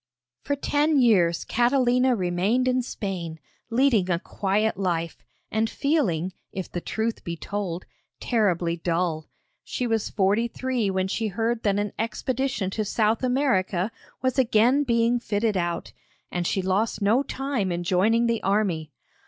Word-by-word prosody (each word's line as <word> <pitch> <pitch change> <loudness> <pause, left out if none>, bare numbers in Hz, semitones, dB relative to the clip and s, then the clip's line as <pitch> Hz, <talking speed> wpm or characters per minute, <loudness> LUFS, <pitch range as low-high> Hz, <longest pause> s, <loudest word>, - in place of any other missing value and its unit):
For 285 - 0
ten 295 +2 +1
years 185 -9 +3
Catalina 250 +1 +3
remained 195 +6 +1
in 255 0 +2
Spain, 185 -9 -5 0.3
leading 230 -6 +3
a 175 - +2
quiet 205 +4 0
life, 170 -4 -2 0.3
and 220 +1 +1
feeling, 190 - 0 0.2
if 190 -1 -6
the 175 - -3
truth 220 +4 -2
be 170 0 -4
told, 185 -2 -4 0.3
terribly 180 -8 +1
dull. 165 -2 -1 0.3
She 250 - -3
was 225 -3 0
forty 205 +3 +2
three 250 -3 -1
when 190 0 0
she 220 +3 -1
heard 225 +3 -1
that 200 -3 +1
an 205 0 -2
expedition 245 -2 -1
to 215 - -1
South 215 +2 +1
America 220 -7 +1 0.3
was 260 +1 +1
again 250 +3 +4
being 235 -1 +2
fitted 210 -1 0
out, 175 -2 -2 0.4
and 175 -1 -1
she 190 - 0
lost 200 +2 0
no 220 +6 +4
time 270 -8 -2
in 175 0 -2
joining 210 +7 +3
the 230 -1 0
army. 190 -6 0
215 Hz, 145 wpm, -25 LUFS, 185-240 Hz, 0.4 s, again